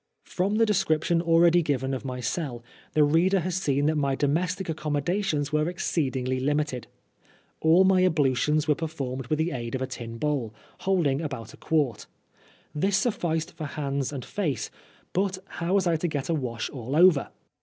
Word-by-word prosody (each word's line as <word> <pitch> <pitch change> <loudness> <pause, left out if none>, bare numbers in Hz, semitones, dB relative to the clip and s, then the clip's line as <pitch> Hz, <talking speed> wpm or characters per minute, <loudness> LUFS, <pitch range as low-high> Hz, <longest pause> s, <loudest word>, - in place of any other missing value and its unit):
From 195 +3 -1
the 225 +1 +4
description 170 -4 +1
already 170 +1 +5
given 135 -4 -1
of 130 - -3
my 130 -2 -4
cell, 120 0 -3 0.3
the 155 - +5
reader 175 +6 +3
has 180 +2 -2
seen 145 -6 +1
that 155 +1 +2
my 140 -2 +1
domestic 175 +7 0
accommodations 150 0 -1
were 150 +2 +2
exceedingly 130 -7 -1
limited. 145 -2 -1 0.7
All 165 +4 +5
my 190 -1 +4
ablutions 150 -2 +2
were 150 - +5
performed 135 -5 -4
with 155 - 0
the 160 +3 0
aid 120 -2 -4
of 130 - -3
a - - 0
tin 120 -3 -7
bowl, 130 -6 -2 0.2
holding 165 -7 +1
about 130 -8 -5
a - - -14
quart. 145 -9 0 0.7
This 190 +6 +1
suf&ced 165 -9 -1
for 155 - -5
hands 140 -2 -2
and 135 -4 -6
face, 160 - -2 0.4
but 190 0 0
how 175 +1 -2
was 195 -2 +3
I 170 -2 +2
to 175 - -1
get 145 -3 -3
a - - +2
wash 120 -7 -3
•*ll 130 +1 -4
over 170 -3 +5
150 Hz, 175 wpm, -26 LUFS, 135-175 Hz, 0.7 s, already